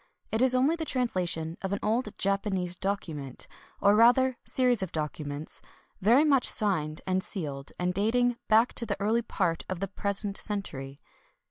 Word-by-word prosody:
It 220 - 0
is 255 0 +4
only 270 +6 +3
the 330 - -3
transla 240 - 0
tion 160 0 -2
of 190 - -3
an 200 - -1
old 220 0 -1
Japanese 195 -2 0
document 160 -9 -3 0.2
— - - -26
or 200 - +6
rather 245 +3 +4
series 250 -4 +3
of 190 - -3
documents 150 -1 -3 0.2
— - - -38
very 240 +10 +5
much 275 -4 +4
signed 160 -7 0
and 185 0 0
sealed, 145 -10 -4
and 180 0 -1
dating 235 +5 +1
back 225 +3 +4
to 235 - -3
the - - -2
early 220 +4 +1
part 170 -7 -1
of 185 -2 -3
the 195 - -2
present 200 +1 -1
century. 140 -10 -4
200 Hz, 175 wpm, -28 LUFS, 175-235 Hz, 0.2 s, or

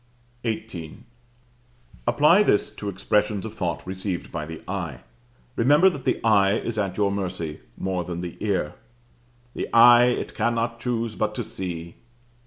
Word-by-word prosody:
XVIII. 110 -5 -5 1.0
Apply 150 +10 +5
this 105 - +2
to 105 - -5
expressions 105 +2 0
of 110 - -6
thought 90 -6 -3
received 95 -1 -4
by 75 -3 -4
the 80 -1 -8
eye. 85 -9 -4 0.5
Remember 145 +10 +5
that 140 -6 -8
the - - +1
eye 100 -3 +4
is 115 -2 -3
at 95 -3 -2
your 100 -1 +2
mercy 90 -6 -3 0.2
more 95 -2 -2
than 85 0 -5
the 90 -1 -6
ear. 95 -8 -1 0.8
"The - - -4
eye 120 +1 +8
it 125 0 -1
cannot 115 +1 -1
choose 115 -2 -2
but 105 0 -2
see." 85 -4 -6
105 Hz, 145 wpm, -24 LUFS, 90-115 Hz, 1.0 s, eye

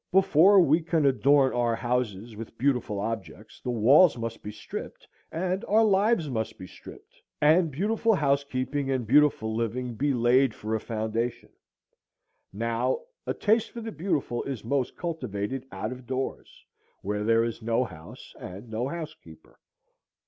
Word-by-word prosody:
Before 190 +1 +6
we 165 -1 +4
can 160 -2 0
adorn 135 0 +4
our 120 -1 +1
houses 120 -3 -2
with 115 +1 -9
beautiful 125 -5 0
objects 110 0 -6
the - - -5
walls 130 +8 +5
must 115 -1 -5
be 105 - -6
stripped, 110 +1 -8 0.2
and 185 +3 -2
our 220 +2 +4
lives 205 -3 +2
must 110 -5 -3
be 95 - -9
stripped, - - -14 0.2
and 160 +3 +4
beautiful 215 - +1
housekeeping 140 -2 -1
and 130 -3 -1
beautiful 125 -4 +3
living 120 +2 -2
be 140 +6 0
laid 125 0 +3
for 110 +1 -4
a 110 - +1
foundation: 115 +2 -3 1.0
now, 115 +4 -1 0.3
a - - -1
taste 220 +1 +2
for 235 - -8
the 225 0 -5
beautiful 150 - -2
is 135 -6 -5
most 135 +1 -1
cultivated 130 - -4
out 100 +4 -4
of 125 -1 -9
doors, 130 0 -5 0.4
where 105 +1 -2
there 115 +1 +3
is 115 0 -4
no 115 +2 +1
house 80 -9 -11
and 100 +6 -9
no 115 +4 -2
housekeeper. 155 - -9
125 Hz, 150 wpm, -27 LUFS, 115-150 Hz, 1.0 s, Before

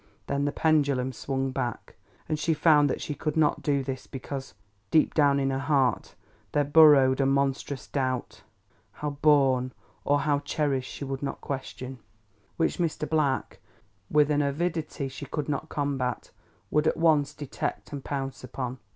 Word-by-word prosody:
Then 140 0 -1
the 145 - 0
pendulum 140 -5 +1
swung 135 +1 -2
back, 120 -2 -4 0.3
and 155 -1 -1
she 160 0 +1
found 150 -2 +5
that - - -2
she 150 - -3
could 155 +2 -3
not 155 -2 +2
do 140 -2 +1
this 130 -1 -5
because, 135 0 -7 0.3
deep 155 - +3
down 140 -2 +4
in 135 0 +1
her 135 - -1
heart, 135 -6 +1 0.4
there 145 - +3
burrowed 145 -3 +6
a 135 - +3
monstrous 135 0 0
doubt 130 -3 -3 0.5
(how 150 0 -4
born 135 -4 +4 0.3
or 145 0 +2
how 145 0 +1
cherished 145 -2 -1
she 140 - -6
would 135 0 -4
not 140 - -4
question), 130 -1 -6 0.6
which 165 - 0
Mr. 160 -3 -1
Black, 145 -4 0 0.5
with 150 0 +4
an 150 0 +2
avidity 155 0 -2
she 135 +1 -8
could 150 -3 -3
not 150 +1 -3
combat, 135 -4 -2 0.4
would 150 +1 +2
at - - +1
once 155 -3 +3
detect 145 0 -5
and 140 -2 -5
pounce 135 -2 -4
upon. 125 0 -5
140 Hz, 160 wpm, -27 LUFS, 135-150 Hz, 0.6 s, burrowed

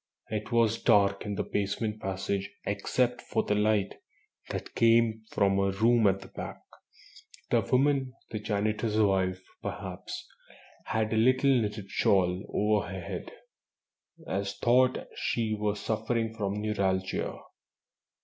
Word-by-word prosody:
It 105 +2 -3
was 115 -1 +2
dark 100 0 +3
in 105 - -2
the - - -1
basement 105 +2 -2
passage 95 +1 -2 0.2
except 120 +5 0
for 110 - -1
the - - 0
light 105 -1 +2 0.6
that - - -5
came 115 -1 +4
from 100 0 +2
a 100 0 +2
room 110 +3 +4
at 95 0 +2
the 95 - -10
back. - - -8 0.9
The - - +4
woman 135 0 +2 0.2
the 110 - -3
janitor's 105 +1 -1
wife, 95 -3 +2 0.2
perhaps - - -6 0.6
had 110 0 0
a - - +1
little 130 +4 +4
knitted 105 -5 0
shawl 90 -1 +2
over 105 0 +1
her 95 +1 -5
head, 85 - -6 1.0
as 100 0 -2
though 125 +2 +5 0.3
she 110 -2 -1
were 105 -1 -1
suffering 110 +2 -1
from 100 -3 -2
neuralgia. 95 -3 -1
105 Hz, 130 wpm, -29 LUFS, 100-115 Hz, 1.0 s, though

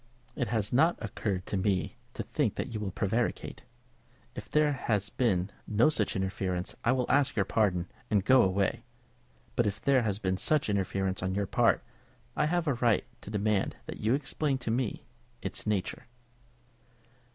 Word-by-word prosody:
"It 125 - -1
has 110 -1 -1
not 160 +7 +5
occurred 95 -4 -3
to 100 - -2
me 95 -3 0 0.2
to - - -3
think - - 0
that - - -4
you 110 - -2
will 105 -2 -2
prevaricate. 110 +5 -1 0.7
If - - -8
there 150 -1 +3
has 105 -6 -1
been 100 -6 +1 0.2
no 110 +7 +4
such 110 -9 0
interference, 95 -2 -2
I 120 - +3
will 130 -1 +1
ask 140 -2 +3
your 100 - +2
pardon, 95 -5 +1 0.2
and 100 -2 +2
go 130 +1 +7
away; 95 -1 +1 0.7
but 120 - +2
if 105 +1 -2
there 135 0 +3
has 105 -4 0
been 95 -3 -1
such 150 0 +1
interference 95 -1 -1
on 95 0 -1
your 100 0 0
part, - - +2 0.5
I 150 - +2
have 175 +1 +1
a 145 - +2
right 120 -2 +2 0.2
to - - -9
demand 105 -1 0
that - - -6
you 110 +3 +2
shall - - +5
explain 140 0 -1
to 120 -3 -3
me 120 -1 -1 0.4
its - - -4
nature." 100 -3 -2
105 Hz, 175 wpm, -30 LUFS, 95-125 Hz, 0.7 s, go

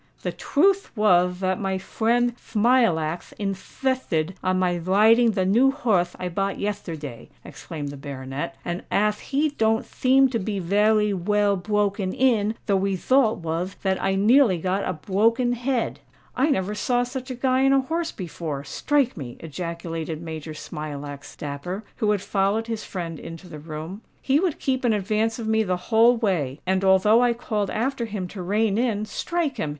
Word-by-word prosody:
"The - - -1
twuth 390 +6 +2
wath 180 -3 +3
that 185 -1 0
my 195 -1 -1
fwiend 235 +5 +1
Thmilackth 210 -10 +1
inthithted 195 -3 -2
on 185 0 +1
my 180 -1 +1
widing 220 +6 +4
the 190 -2 0
new 240 +8 +4
horth 215 -12 0
I 180 - -4
bought 195 +3 -1
yethterday," 160 - -5 0.2
exclaimed 150 -4 -7
the 140 - -8
baronet; 135 -1 -5
"and 175 +1 -3
ath 210 +1 +1
he 290 +3 0
don't 225 -5 +1
theem 265 +1 +3
to 235 -2 -1
be 205 +1 -3
veway 210 +3 +2
well 205 +2 +1
bwoken 200 0 -1
in, 225 -4 +2
the 200 - +2
wethult 200 +5 +2
wath 165 +4 -3
that 190 -1 0
I 195 0 +1
nearly 215 0 +5
got 185 +4 -1
a - - 0
bwoken 225 +9 +1
head." 245 0 -1 0.4
"I 270 +5 +2
never 200 -7 0
saw 245 +3 +1
such 255 +1 -6
a 255 - -4
Guy 260 +1 +2
on - - +4
a 275 0 +4
horse 325 +4 -2
before—strike 175 - -2
me!" 125 -6 -7
ejaculated 165 0 -5
Major 160 -1 -7
Smilax 145 -2 -7
Dapper, 150 +8 -5
who 215 - +1
had 205 -2 +1
followed 200 +3 0
his 225 -2 -4
friend 165 -4 -5
into 165 +2 -9
the 155 -3 -9
room. 160 +6 -7 0.2
"He 275 +2 +2
would 355 -3 0
keep 260 -1 -1
in 235 -3 +3
advance 215 +2 0
of 230 -2 -5
me 220 0 +3
the 185 -4 0
whole 230 +2 +6
way; 165 - -1
and 190 +1 +1
although 195 +4 +5
I 245 -1 +3
called 215 -4 -2
after 250 +2 -1
him 200 -4 -4
to 190 - -7
rein 205 +3 +1
in—strike 250 - -1
him! 155 - -2
205 Hz, 170 wpm, -24 LUFS, 175-235 Hz, 0.4 s, whole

